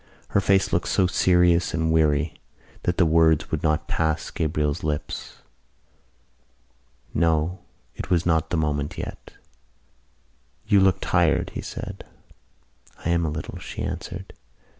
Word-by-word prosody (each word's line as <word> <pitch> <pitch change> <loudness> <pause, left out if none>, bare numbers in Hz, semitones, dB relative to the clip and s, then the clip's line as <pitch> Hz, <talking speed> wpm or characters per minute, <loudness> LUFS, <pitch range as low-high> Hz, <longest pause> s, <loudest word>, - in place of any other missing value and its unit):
Her 100 - +2
face 95 0 +2
looked - - +1
so 95 - +2
serious 90 -1 +3
and 80 0 +1
weary 75 -1 +1 0.4
that 90 - -1
the 90 - +5
words 80 -1 +3
would 80 - -1
not 75 -3 0
pass 80 0 -1
Gabriel's 75 -2 -1
lips. 75 -1 -4 1.7
No, 80 +2 +1 0.4
it - - -6
was 90 -2 +2
not 80 -2 +2
the 85 - 0
moment 75 -2 -1
yet. - - -7 1.3
"You 100 - +4
looked 95 -2 +3
tired," - - +2
he - - -5
said. - - -7 1.0
"I 85 - +1
am 85 0 +2
a 80 - 0
little," 75 0 -6
she - - -6
answered. - - -6
80 Hz, 135 wpm, -24 LUFS, 75-90 Hz, 1.7 s, the